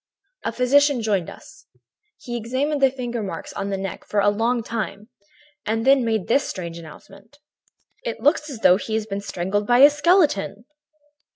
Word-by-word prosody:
"A - - -1
physician 275 0 +3
joined 200 -6 0
us. 310 +1 -15 0.5
He 240 - -7
examined 260 +6 -2
the 270 - +6
finger 245 -3 -5
marks 200 - -6
on 200 - -4
the 195 - -2
neck 190 -2 -6
for 210 - -1
a 205 +1 +4
long 230 +3 0
time 215 -1 -5 0.5
and 225 +2 -2
then 270 -1 +5
made 220 -4 -1
this 275 +4 +2
strange 170 -3 -6
announcement: 195 - -15 0.7
"'It - - -4
looks 300 +1 +1
as 245 -6 -8
though 180 - +6
he 220 +1 -4
had 220 -1 -2
been 200 0 -3
strangled 200 +2 -2
by 245 - +4
a 285 +3 +8
skeleton.' 290 - +1
225 Hz, 175 wpm, -22 LUFS, 200-270 Hz, 0.7 s, a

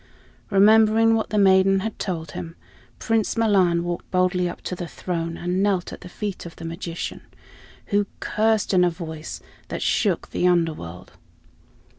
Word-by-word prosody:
Remembering 220 +2 +5
what 225 -1 0
the 210 - -1
maiden 195 -1 +5
had 220 +2 -5
told 165 -4 -4
him, 165 0 -7 0.4
Prince 225 0 0
Milan 190 -6 +3
walked 175 0 -4
boldly 180 -1 +1
up - - -8
to 180 - -4
the 175 -1 -5
throne 165 -1 -4
and 180 +2 -1
knelt 195 -3 0
at - - -10
the 180 - -10
feet 205 +1 -5
of 170 - -10
the 165 - -9
magician, 170 0 -5 0.7
who 205 0 +3
cursed 220 -1 +1
in 180 -1 +5
a 180 - +4
voice 160 -2 -7 0.3
that - - -4
shook - - 0
the 180 - +1
Underworld. 155 - -1
180 Hz, 160 wpm, -23 LUFS, 170-205 Hz, 0.7 s, Remembering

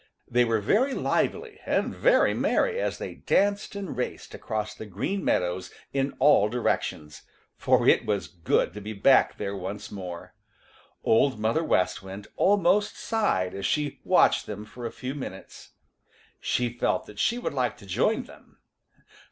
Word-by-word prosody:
They 120 +1 +3
were 115 -1 +1
very 240 - +2
lively - - -1
and - - 0
very - - +4
merry 475 -1 +1
as - - -2
they - - -6
danced 200 +1 0
and 200 -4 -5
raced 125 - -4
across 105 -1 -4
the 110 - -9
Green 105 - -3
Meadows 90 +1 0 0.2
in 135 0 -1
all 130 -7 +5
directions, 90 -9 -2 0.3
for - - +2
it - - +5
was 100 -2 -1
good 85 -1 0
to 105 - -8
be 105 +2 -6
back 130 +6 +4
there 100 -1 -3
once 95 +2 -6
more. 90 -4 -7 0.7
Old 115 +1 +3
Mother 115 +10 +1
West 90 - +1
Wind 95 +2 -9
almost 205 +1 +3
sighed 95 - 0
as 100 0 -2
she 150 -2 -1
watched - - +3
them 105 0 -6
for 120 +2 -7
a - - -7
few 130 +1 -5
minutes. 130 -9 -9 0.7
She 125 -1 0
felt 120 - 0
that 105 - -12
she 235 - +2
would 245 - -3
like 130 -3 -1
to 100 - -14
join 95 - +1
them. - - -17
115 Hz, 160 wpm, -26 LUFS, 100-150 Hz, 0.7 s, all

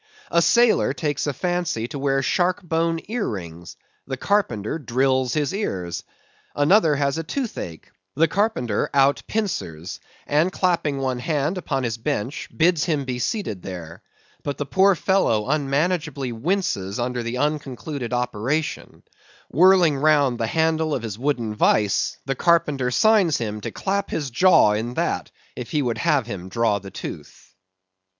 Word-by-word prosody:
A 170 - +4
sailor 235 +5 +4
takes 150 -3 -2
a - - +1
fancy 175 -6 -2
to 140 - -6
wear 135 -1 +1
shark 180 +6 +1
bone 165 0 0
ear 225 0 -2
rings: 85 -4 -8 0.3
the 130 -1 -3
carpenter 145 - 0
drills 130 0 +1
his 150 0 0
ears. 90 - -3 0.5
Another 155 +1 +4
has 140 +1 0
the 165 - -2
toothache: 165 - -5 0.2
the 165 - +4
carpenter 160 - 0
out 140 0 +4
pincers, 95 - -3 0.3
and 155 +5 +2
clapping 170 -6 0
one 130 -2 -1
hand 150 +6 -1
upon 135 -6 -2
his 115 -1 -2
bench 130 0 -3
bids 170 -1 +3
him 150 -5 -1
be 125 -1 -3
seated 125 - -2
there; 85 -3 -8 0.4
but 145 - -4
the 145 - -3
poor 190 +6 +4
fellow 150 - +1
unmanageably 150 -1 0
winces 115 - -1
under 125 0 -1
the 115 +1 -3
unconcluded 140 -3 -3
operation; 125 +5 -2 0.5
whirling 175 -1 +5
round 145 -4 +3
the 115 - 0
handle 160 +2 +1
of 125 - -4
his 110 -2 -5
wooden 125 -5 -1
vice, 105 -1 +2
the 135 - 0
carpenter 150 -4 +2
signs 210 - +4
him 105 -3 -4
to - - -4
clap 200 0 -2
his 145 -5 -3
jaw 155 - +5
in 115 +4 -2
that, - - -1 0.3
if 125 - -6
he 150 -2 0
would 120 -2 -2
have 150 -7 +2
him 95 -5 -7
draw 110 -1 +1
the 100 0 -10
tooth. - - -9
140 Hz, 155 wpm, -23 LUFS, 115-165 Hz, 0.5 s, whirling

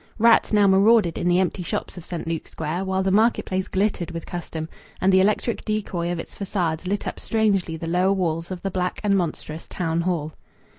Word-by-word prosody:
Rats 230 0 +5
now 210 -2 +5
marauded 195 -1 +4
in - - -1
the 175 0 +4
empty 185 0 0
shops 175 - -3
of 175 - -9
St. 175 -1 -5
Luke's 165 -1 -4
Square, 165 +4 -3
while 190 0 0
the 190 - +1
market 220 +4 +3
place 185 0 -2
glittered 190 -3 0
with 165 -1 -6
custom, 165 -2 -5 0.3
and 190 +1 +3
the 190 - +6
electric 210 +4 +1
decoy 195 -5 -2
of 175 - -2
its 165 - -7
façades 180 -4 -2
lit 200 +2 -1
up - - -4
strangely 200 -7 +1
the 165 - -6
lower 180 +3 +2
walls 165 -3 -1
of 185 -2 -6
the 195 - -2
black 180 0 -2
and 200 -1 +3
monstrous 165 -3 -3
Town 165 -2 -1
Hall. 165 -4 -2
185 Hz, 210 wpm, -23 LUFS, 170-195 Hz, 0.3 s, the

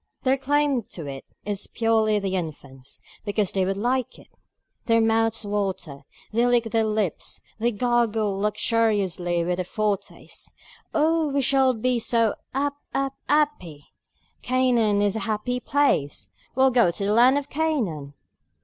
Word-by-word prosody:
Their 265 +1 +2
claim 285 -1 +1
to 165 - -6
it 135 -1 -7 0.2
is 205 -1 -3
purely 220 -2 +2
the 195 -2 -2
infant's, 140 -6 -7 0.2
because 205 -2 -1
they 190 -1 0
would 195 +1 -1
like 245 +3 -1
it. - - -17 0.6
Their 230 -1 +3
mouths 225 0 +1
water, 190 -9 -3 0.3
they 235 +2 +2
lick 240 -1 +3
their 225 -1 +2
lips, 215 -5 -2 0.2
they 235 +2 +1
gurgle 225 -2 +1
luxuriously 205 -5 0
with 175 +1 -1
the 185 - -1
foretaste: 205 +1 -4 0.4
"Oh, 320 +1 +2
we 280 -1 0
shall 265 -1 +3
be 245 +2 0
so 230 -1 +2 0.2
'ap 280 +2 -1 0.2
'ap 275 0 0 0.2
'appy! 290 - 0 0.5
Canaan 240 -5 +2
is 205 0 +1
a - - -1
happy 235 +4 -1
place; 150 - 0 0.3
we'll 265 +1 +4
go 240 -7 +4
to 185 +4 -3
the 205 - +1
land 250 +5 +5
of 285 0 -4
Canaan!" 215 - -2
225 Hz, 150 wpm, -24 LUFS, 195-255 Hz, 0.6 s, land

